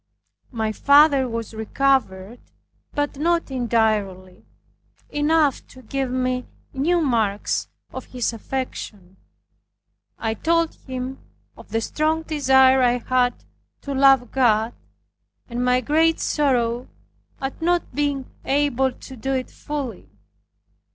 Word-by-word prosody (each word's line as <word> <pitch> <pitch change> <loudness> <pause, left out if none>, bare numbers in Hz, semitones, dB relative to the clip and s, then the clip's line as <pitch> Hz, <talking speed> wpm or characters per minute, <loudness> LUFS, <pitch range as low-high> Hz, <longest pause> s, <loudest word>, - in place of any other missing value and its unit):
My 220 -3 -1
father 280 +1 +5
was 230 -1 -5
recovered, 220 -2 0 0.5
but 290 -1 -2
not 335 -1 +1
entirely, 215 -7 -1 0.6
enough 295 -1 +2
to 255 - -15
give 270 +3 -2
me 255 0 -1 0.3
new 335 +6 +1
marks 220 -8 0 0.3
of - - -6
his 245 -2 -2
affection. 210 -6 -6 1.0
I 225 -1 -2
told 335 +6 +1
him 260 0 -6 0.4
of - - -15
the 225 - -1
strong 315 +6 0
desire 265 -4 +4
I 245 -1 +3
had 250 0 0 0.4
to 280 - -5
love 270 -3 +4
God, 230 -3 +2 0.7
and 245 0 -3
my 250 0 +3
great 320 +5 +2
sorrow 245 -4 0 0.5
at 270 +2 -5
not 345 -2 0
being 285 -1 -1 0.2
able 270 -2 +1
to 265 - -12
do 270 +3 -3
it 255 -1 -3
fully. 265 - -6
260 Hz, 115 wpm, -22 LUFS, 230-285 Hz, 1.0 s, father